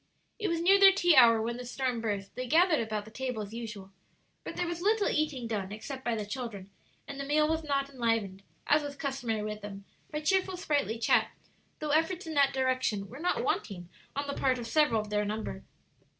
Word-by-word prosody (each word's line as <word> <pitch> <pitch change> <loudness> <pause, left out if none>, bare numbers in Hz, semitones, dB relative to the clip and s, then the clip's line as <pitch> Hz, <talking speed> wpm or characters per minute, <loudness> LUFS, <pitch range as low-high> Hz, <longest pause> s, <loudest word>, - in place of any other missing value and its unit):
It 425 - -1
was 335 0 -1
near 390 +3 +5
their 390 0 +9
tea 350 -4 +3
hour 230 -3 +7
when 235 +2 -2
the 250 - -6
storm 250 -1 -2
burst; 200 -3 -3
they 255 0 -5
gathered 330 +3 +4
about 215 -2 -3
the 220 - -13
table 250 -3 -3
as 205 +1 -10
usual, 215 -4 -7 0.5
but - - -7
there 355 - -1
was 345 0 -4
little 420 +2 +2
eating 300 -5 -1
done 205 -4 -3
except 260 +5 -7
by 240 -3 0
the 215 -2 -3
children, 205 -4 -6 0.4
and 280 -1 -7
the - - -2
meal 300 +2 +2
was 320 +1 -1
not 275 -2 0
enlivened, 225 -7 -1 0.2
as 295 +1 +4
was 285 -1 -6
customary 265 -7 -2
with 210 0 -5
them, 200 -1 -8 0.2
by 300 - -3
cheerful, 375 +3 +1
sprightly 290 - 0
chat, 230 - +3 0.5
though 305 -1 -3
efforts 325 +4 +1
in 320 - -5
that 280 -2 +4
direction 255 -7 0
were 255 - -10
not 355 +3 0
wanting 180 - -2 0.3
on 285 +1 -2
the 280 - -3
part 260 -2 +1
of 240 - -5
several 230 -3 +3
of 210 0 -10
their 210 0 +1
number. 215 +1 -4
255 Hz, 215 wpm, -30 LUFS, 220-305 Hz, 0.5 s, their